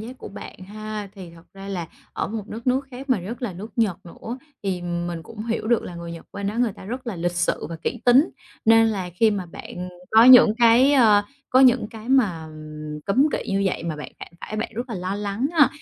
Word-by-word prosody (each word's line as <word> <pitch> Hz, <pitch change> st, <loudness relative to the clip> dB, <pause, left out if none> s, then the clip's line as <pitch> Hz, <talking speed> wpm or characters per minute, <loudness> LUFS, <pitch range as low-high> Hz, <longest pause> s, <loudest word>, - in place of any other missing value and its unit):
giác 245 Hz, +4 st, -9 dB
của -, -, -8 dB
bạn 200 Hz, -, -10 dB
ha. 215 Hz, -1 st, -6 dB
Thì 185 Hz, -4 st, -10 dB
thật 165 Hz, -, -16 dB
ra 195 Hz, 0 st, -9 dB
là 180 Hz, -4 st, -3 dB, 0.3 s
ở -, -, -2 dB
một 215 Hz, -1 st, -5 dB
đất 230 Hz, +3 st, -8 dB
nước 260 Hz, +2 st, +1 dB
khác 260 Hz, +2 st, -8 dB
mà 240 Hz, -7 st, +3 dB
rất 225 Hz, +9 st, -7 dB
là 235 Hz, -6 st, -2 dB
nước 200 Hz, +6 st, -9 dB
Nhật 210 Hz, -7 st, +1 dB
nữa, 230 Hz, +8 st, -8 dB, 0.2 s
thì 185 Hz, -3 st, -2 dB
mình 175 Hz, -1 st, -3 dB
cũng 215 Hz, +6 st, -8 dB
hiểu 225 Hz, -1 st, -2 dB
được 235 Hz, 0 st, +2 dB
là 175 Hz, -, -8 dB
người 170 Hz, 0 st, -7 dB
Nhật 165 Hz, -, -10 dB
bên 200 Hz, 0 st, -4 dB
đó 205 Hz, -, -2 dB
người 240 Hz, -4 st, +2 dB
ta 190 Hz, -, -13 dB
rất 250 Hz, +5 st, -6 dB
là 220 Hz, -, -4 dB
lịch 175 Hz, +1 st, -1 dB
sự 175 Hz, 0 st, -1 dB
và 165 Hz, -, -6 dB
kỹ 245 Hz, -, -3 dB
tính, 255 Hz, +6 st, +5 dB, 0.3 s
nên 225 Hz, 0 st, +6 dB
là 195 Hz, -5 st, -2 dB
khi 220 Hz, +4 st, +4 dB
mà 195 Hz, -4 st, -3 dB
bạn 180 Hz, +2 st, -8 dB, 0.2 s
có 225 Hz, +1 st, +7 dB
những 245 Hz, -4 st, +9 dB
cái, 240 Hz, +4 st, +6 dB
ờ, 220 Hz, -7 st, +5 dB, 0.3 s
có 255 Hz, -, +5 dB
những 250 Hz, -4 st, +5 dB
cái 220 Hz, +1 st, -10 dB
mà, 210 Hz, -12 st, +2 dB
ừm, 155 Hz, -1 st, -8 dB
cấm 255 Hz, +9 st, +4 dB
kỵ -, -, -1 dB
như 195 Hz, 0 st, +1 dB
vậy 190 Hz, -, -2 dB
mà 165 Hz, -2 st, -3 dB
bạn 150 Hz, -, -8 dB
phạm -, -, -8 dB
phải, 215 Hz, -, -6 dB
bạn 220 Hz, -, -2 dB
rất 240 Hz, +3 st, -4 dB
là 230 Hz, -, -4 dB
lo 185 Hz, +1 st, -3 dB
lắng 205 Hz, +5 st, -2 dB
ha? 310 Hz, -4 st, +6 dB
210 Hz, 250 wpm, -23 LUFS, 180-235 Hz, 0.3 s, những